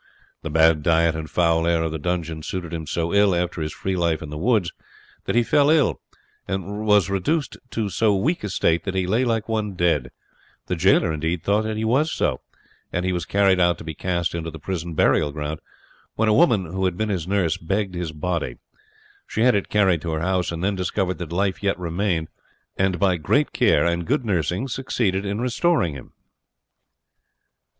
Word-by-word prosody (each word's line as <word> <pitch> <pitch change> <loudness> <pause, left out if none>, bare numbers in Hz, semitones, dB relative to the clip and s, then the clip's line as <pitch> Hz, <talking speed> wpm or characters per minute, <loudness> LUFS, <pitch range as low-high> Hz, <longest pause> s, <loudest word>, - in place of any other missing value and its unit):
The 80 - -5
bad 80 0 +4
diet 80 +1 +3
and 80 -1 -5
foul 85 -1 +2
air 85 -1 +2
of 80 - -2
the 80 - -4
dungeon 85 -1 -3
suited 85 0 -5
him 80 -2 -5
so 85 +3 -2
ill, 100 -2 +4
after 85 -1 -2
his 75 0 -3
free 95 +4 -3
life 85 -3 0
in 75 - -8
the 75 - -5
woods, 100 -3 +1 0.5
that - - -1
he 120 - +4
fell 145 +4 +3
ill, 155 -3 +3 0.5
and 100 +3 -4
was 105 -5 +5
reduced 115 - -1
to 110 -3 -2
so 100 +3 +2
weak 145 - 0
a 105 - -3
state 85 -2 +1
that 95 -2 -3
he 95 -1 +1
lay 110 +7 +1
like 115 -3 0
one 110 -3 -2
dead 85 -8 +1 0.6
the - - -2
jailer 80 - +3
indeed 80 +2 -2
thought 105 +2 +1
that 110 0 -3
he 110 - -1
was 140 +8 +2
so, - - -1 0.5
and 90 +1 -2
he 95 - 0
was 85 -2 -2
carried 100 -2 +3
out 85 -2 +3
to - - -10
be 80 0 -5
cast 85 +1 -2
into 85 -1 -4
the 80 - -9
prison 85 0 -5
burial 75 -1 +3
ground, 75 +1 -4 0.6
when 110 - +1
a 110 - +4
woman, 115 - +4
who 95 +3 -2
had 90 -2 -1
been 110 0 -1
his 90 -5 -2
nurse, 95 -4 +1
begged 95 +3 -2
his 85 -3 -3
body. 85 +2 -3 0.7
She - - -2
had 125 - +5
it 100 -2 -1
carried 95 -6 +3
to 80 -2 -3
her 80 - -2
house, 90 0 0
and 85 +1 -4
then 100 +2 +1
discovered 95 0 -2
that 85 -2 -6
life 95 0 -1
yet 100 -1 0
remained, 85 -1 -1 0.5
and 95 -1 +1
by 95 -2 +2
great 75 - +1
care - - +3
and 85 0 -1
good 135 +1 0
nursing 90 - -1
succeeded 110 -7 -1
in 100 +2 -2
restoring 125 - +1
him. 70 - -11
90 Hz, 205 wpm, -23 LUFS, 80-105 Hz, 0.7 s, was